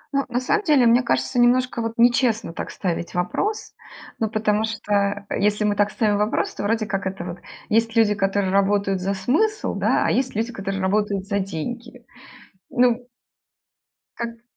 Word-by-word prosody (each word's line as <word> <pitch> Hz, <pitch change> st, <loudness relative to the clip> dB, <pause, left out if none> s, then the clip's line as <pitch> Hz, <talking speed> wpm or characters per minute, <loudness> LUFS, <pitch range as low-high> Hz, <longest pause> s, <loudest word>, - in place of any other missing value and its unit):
Ну, 275 Hz, -, +1 dB
на 245 Hz, 0 st, 0 dB
самом 420 Hz, +11 st, +1 dB
деле, 295 Hz, -8 st, +4 dB
мне 235 Hz, +2 st, +5 dB
кажется, 245 Hz, +1 st, 0 dB
немножко 245 Hz, 0 st, +3 dB
вот 225 Hz, 0 st, -3 dB
нечестно 235 Hz, -5 st, +2 dB
так -, -, -5 dB
ставить 170 Hz, -2 st, -4 dB
вопрос. 395 Hz, -, -2 dB, 0.5 s
Ну, 220 Hz, -, 0 dB
потому 215 Hz, 0 st, +1 dB
что 205 Hz, -2 st, -1 dB
если 210 Hz, +1 st, +1 dB
мы 205 Hz, -1 st, +1 dB
так 205 Hz, 0 st, +2 dB
ставим 210 Hz, -2 st, +1 dB
вопрос, 210 Hz, +1 st, 0 dB
то -, -, -6 dB
вроде 215 Hz, +2 st, 0 dB
как 195 Hz, -2 st, -2 dB
это 190 Hz, -2 st, -5 dB
вот 175 Hz, 0 st, -7 dB, 0.3 s
есть 225 Hz, +1 st, +1 dB
люди, 220 Hz, -2 st, +4 dB
которые 195 Hz, -1 st, 0 dB
работают 195 Hz, -1 st, +1 dB
за 195 Hz, +1 st, -1 dB
смысл, 380 Hz, -, 0 dB
да, -, -, +1 dB
а -, -, +2 dB
есть 260 Hz, -2 st, 0 dB
люди, 230 Hz, +3 st, -2 dB
которые 195 Hz, -1 st, -4 dB
работают 200 Hz, 0 st, 0 dB
за 200 Hz, -1 st, 0 dB
деньги. 235 Hz, +7 st, -6 dB, 0.7 s
Ну. 245 Hz, 0 st, +2 dB, 1.1 s
Как 235 Hz, 0 st, -6 dB
215 Hz, 170 wpm, -22 LUFS, 200-240 Hz, 1.1 s, мне